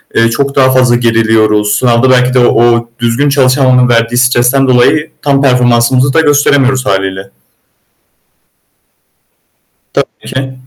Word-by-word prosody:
eee, 115 0 +2
çok 140 +4 -3
daha 130 -1 +2
fazla 125 -2 +2
geriliyoruz. 110 -3 0
Sınavda 120 +2 +1
belki 125 0 +1
de 130 - +1
o 120 -1 +1
düzgün 120 +5 -1
çalışamamanın 130 -2 +1
verdiği 115 0 0
stresten 125 +2 +1
dolayı, 145 +5 +1
tam 140 -2 0
performansımızı 125 0 +1
da 165 - +2
gösteremiyoruz 140 -3 +1
hâliyle. 95 -1 -3 2.9
Tabii - - -10
ki. 130 0 -5
125 Hz, 120 wpm, -9 LUFS, 115-135 Hz, 2.9 s, eee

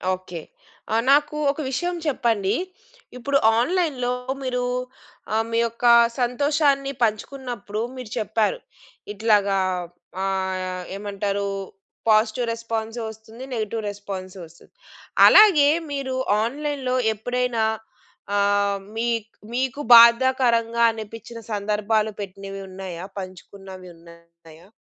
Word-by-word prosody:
Okay. 180 -2 -9 0.5
ఆ! - - +2 0.2
నాకు 295 +1 +3 0.2
ఒక 285 - -10
విషయం 350 +7 -2
చెప్పండి. 225 -8 +1 0.6
ఇప్పుడు 275 +3 +1 0.2
ఆన్‌లైన్‌లో 270 -4 0 0.3
మీరు 250 -1 -1 0.7
ఆహ్, 220 +1 +1
మీ 230 - +1
యొక్క 230 +1 -4 0.4
సంతోషాన్ని 275 +2 +1
పంచుకున్నప్పుడు 225 -1 -3
మీరు 250 -4 -8
చెప్పారు. 220 - 0 0.5
ఇట్లాగా 205 -2 +2 0.7
ఆహ్, 190 -1 -2
ఏమంటారూ, 200 0 -3 0.6
పాజిటివ్ 220 +2 +3
రెస్పాన్సు 225 0 -4
ఒస్తుంది, 220 +3 -13
నెగెటివ్ 220 -1 -3
రెస్పాన్సు 195 -2 -7
ఒస్తుంది. 165 +2 -21 0.6
అలాగే 350 -10 +7 0.2
మీరు 275 -2 -3 0.3
ఆన్‌లైన్‌లో 275 +1 -2 0.2
ఎప్పుడైనా 245 +1 -1 0.7
ఆహ్, 200 0 +2 0.2
మీక్ 230 -1 -1 0.2
మీకు 260 +3 -1
బాధాకరంగా 235 -1 +5
అనిపించిన 225 +1 -9
సందర్భాలు 210 +1 0
పెట్టినవి 195 0 -7
ఉన్నాయా? 185 -2 -7
పంచుకున్నవి 185 0 -9
ఉన్నాయా? 170 0 -18
225 Hz, 95 wpm, -23 LUFS, 200-250 Hz, 0.7 s, అలాగే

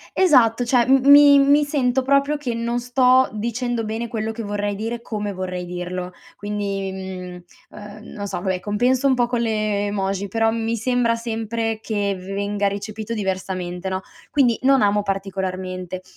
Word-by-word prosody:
Esatto, 250 -10 +4
cioè 240 0 +3
m 270 +2 +5
mi 285 0 +8
mi 285 +2 +4
sento 265 -3 0
proprio 280 +2 +2
che 265 -5 -3
non 235 +1 -2
sto 255 +1 +3
dicendo 235 +2 -2
bene 225 +2 -3
quello 220 -1 -3
che 225 +1 -6
vorrei 205 0 -2
dire, 225 +3 -4
come 210 -3 -4
vorrei 180 -1 -4
dirlo 180 +1 -5 0.3
quindi, 200 -2 -3
mhmm, 185 -2 -7 0.3
uhm, 210 0 -10 0.2
non 205 -1 -5
so - - -4
vabbè 185 -1 -1
compenso 245 +7 +1
un 265 - +3
po' 245 -1 +2
con 240 -1 -1
le 215 -3 0
emoji, 195 -1 -2
però 225 +2 +1
mi 230 0 -2
sembra 235 0 +1
sempre 225 -1 -3
che 205 -3 -1
venga 200 +2 -2
recepito 215 +3 -4
diversamente 190 -2 -3
no? 185 0 -3 0.3
Quindi 255 -5 +3
non 270 -2 +4
amo 205 0 +2
particolarmente 185 -2 -4
215 Hz, 165 wpm, -21 LUFS, 195-240 Hz, 0.3 s, mi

